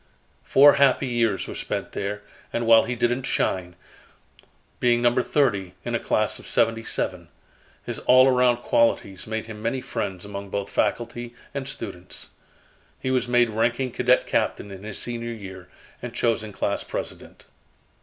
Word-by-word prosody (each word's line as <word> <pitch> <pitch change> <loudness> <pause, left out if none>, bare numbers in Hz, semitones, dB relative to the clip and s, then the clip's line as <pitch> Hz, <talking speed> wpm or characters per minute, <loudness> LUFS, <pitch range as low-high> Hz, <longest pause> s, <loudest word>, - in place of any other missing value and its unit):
Four 140 +1 +7
happy 140 0 +4
years 115 -5 0
were - - -6
spent - - -4
there 105 +1 -4 0.3
and 120 - -1
while 115 0 +6
he 125 +2 -2
didn't 120 +2 +1
shine, 90 -1 -1 1.0
being 120 -1 +3
number 120 +1 +3
thirty 100 -11 0
in - - -3
a - - +1
class - - 0
of - - -12
seventy 115 0 +1
seven, - - -3 0.6
his - - -3
all 130 +1 +6
around 125 -2 +4
qualities 100 -5 +1
made 110 0 -3
him 110 -1 -9
many 115 +4 -1
friends 100 -7 -4
among 100 -1 -7
both 100 0 -3
faculty 120 0 -2 0.2
and 140 -1 -4
students. 95 -9 -7 0.7
He 130 - -2
was 130 -1 +1
made 120 -1 +3
ranking 120 +4 0
cadet 125 +2 +3
captain 100 - -1
in 95 -1 -9
his 110 -1 -6
senior 120 -1 -4
year, 95 -4 -10 0.3
and 120 -1 -7
chosen 115 -3 0
class - - -2
president. - - -7
115 Hz, 155 wpm, -24 LUFS, 105-125 Hz, 1.0 s, Four